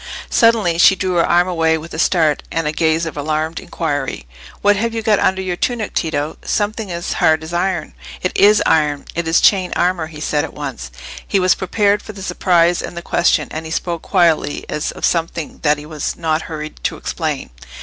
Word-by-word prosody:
Suddenly 220 -8 +3
she 190 - +7
drew 185 -1 -2
her 170 - +4
arm 175 +1 +4
away 165 -2 +1
with 160 +2 -10
a 160 - -5
start, 160 -4 +2
and 165 -1 -1
a 150 - 0
gaze 160 +1 +1
of 160 - -5
alarmed 155 +2 -2
inquiry. 145 - -3 0.4
"What 205 0 +5
have 230 +3 -2
you 225 - -2
got 215 -2 +3
under 190 0 +1
your 180 -1 -2
tunic, 230 +3 -2
Tito? 155 -2 -2
Something 210 -1 -2
as 170 0 -3
hard 160 0 +2
as 160 +2 -8
iron." 175 -2 -1 0.3
"It 185 - 0
is 210 +1 +5
iron—it 155 +2 0
is 165 - +4
chain 185 -3 +3
armour," 175 -2 +1
he 155 -1 -11
said 150 -1 0
at 160 - -7
once. 135 - -6 0.4
He 200 - +2
was 185 0 +4
prepared 205 +2 +1
for 215 - -10
the 195 -1 -9
surprise 175 -3 +2
and 170 - -7
the 170 - -5
question, 170 -4 +2
and 155 - -5
he 160 - -8
spoke 170 0 -2
quietly, 165 -6 +1
as 150 - -2
of - - -3
something 165 -2 -2
that 150 -1 +3
he 145 - -9
was 155 -2 -4
not 160 -1 0
hurried 155 -1 -7
to - - -1
explain. - - -3
170 Hz, 205 wpm, -18 LUFS, 155-185 Hz, 0.4 s, she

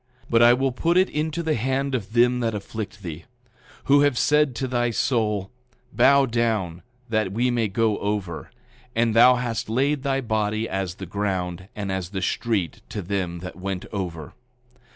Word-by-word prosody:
8:23 - - -29
But 115 0 +5
I 120 +1 +8
will 135 +1 +1
put 170 +8 +1
it 185 +1 +4
into 155 +2 -2
the 160 -1 +1
hand 135 +3 -1
of 110 -4 -3
them 125 +1 +4
that 115 -3 -1
afflict 105 0 -6
thee; 85 -2 -7 0.6
who 140 +1 +5
have 145 -4 +2
said 150 -2 +3
to 130 - -2
thy 120 -1 0
soul: 105 -4 0 0.4
Bow 140 0 +5
down, 110 -8 -1 0.3
that 110 -4 0
we 120 +5 +1
may 115 -2 +1
go 105 +1 0
over—and 110 +4 -3
thou 125 +3 +7
hast 120 -3 -3
laid 135 +5 +1
thy 135 -1 0
body 110 -2 -1
as 95 -3 -3
the 95 - -7
ground 95 -2 -3
and 100 -2 -3
as 95 -2 -3
the 95 -1 -4
street 110 -9 -1
to 105 - -5
them 90 -2 -3
that 90 -2 -8
went 95 0 -4
over. 85 -7 -5
110 Hz, 175 wpm, -24 LUFS, 95-125 Hz, 0.6 s, I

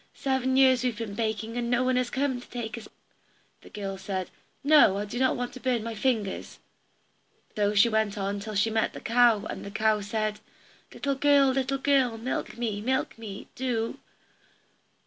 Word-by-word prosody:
Seven 265 -1 0
years 260 -2 +5
have 245 -3 -1
we 230 - -2
been 205 - -8
baking, 220 +1 -3
and 240 -1 -1
no 245 +1 +2
one 255 0 +1
has 250 -1 +1
come 265 -1 -1
to - - -14
take 235 -2 -5
us 230 - -9
out," - - -27 0.7
the - - -15
girl 195 -2 -5
said, 190 -2 -4 0.3
"No, 285 -9 +6
I 205 - -2
don't 245 +5 0
want 245 0 -4
to 255 - -9
burn 245 -3 0
my 230 0 -4
fingers." 215 -3 -2 1.0
So 205 0 +1
she 200 +3 +6
went 220 -2 0
on 200 0 -2
till 215 +1 -6
she 215 +3 +2
met 220 0 0
the - - -7
cow, 230 -3 +3
and - - -6
the - - -6
cow 215 0 +1
said, 215 +1 -2 0.5
"Little 280 -1 -2
girl, 280 0 +4
little 265 +1 0
girl, 265 -4 +2
milk 235 +2 -4
me, 220 -4 -2
milk 260 +4 -1
me, 205 -3 -8
do. 240 -3 -2
230 Hz, 190 wpm, -27 LUFS, 210-255 Hz, 1.0 s, No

